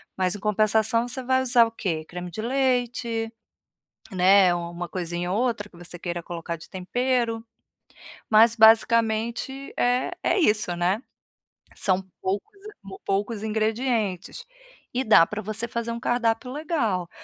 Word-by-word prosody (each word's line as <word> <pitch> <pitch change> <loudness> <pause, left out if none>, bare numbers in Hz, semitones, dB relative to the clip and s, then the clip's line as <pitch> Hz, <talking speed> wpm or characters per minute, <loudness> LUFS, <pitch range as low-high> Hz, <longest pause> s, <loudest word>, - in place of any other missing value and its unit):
mas 185 +1 0
em - - -7
compensação 215 +3 +2
você 250 +2 -4
vai 260 +1 +1
usar 245 -2 +5
o 225 - -6
quê? 165 -8 -3
Creme 175 +1 -7
de 195 - -5
leite, 245 -2 0 0.8
né, 185 0 +5
uma 175 0 -5
coisinha 175 0 -3
ou 200 - 0
outra 225 -5 -2
que - - -18
você 175 0 -8
queira 175 0 -4
colocar 170 0 -5
de 165 - -14
tempero, 230 +4 -1 0.9
mas 225 +1 +6
basicamente, 230 +4 +3
é 245 +1 +1
é - - +2
isso, 210 - +2
né. 180 +5 0 0.7
São 190 -1 +1 0.2
poucos 200 - -3 0.5
poucos 205 +2 -1
ingredientes 220 - -1 0.5
e 255 +2 0
dá 215 -8 +6
para 210 +4 -5
você 215 +3 -4
fazer 235 0 -3
um 235 - -4
cardápio 240 0 0
legal. 250 - -1
220 Hz, 140 wpm, -25 LUFS, 185-240 Hz, 0.9 s, mas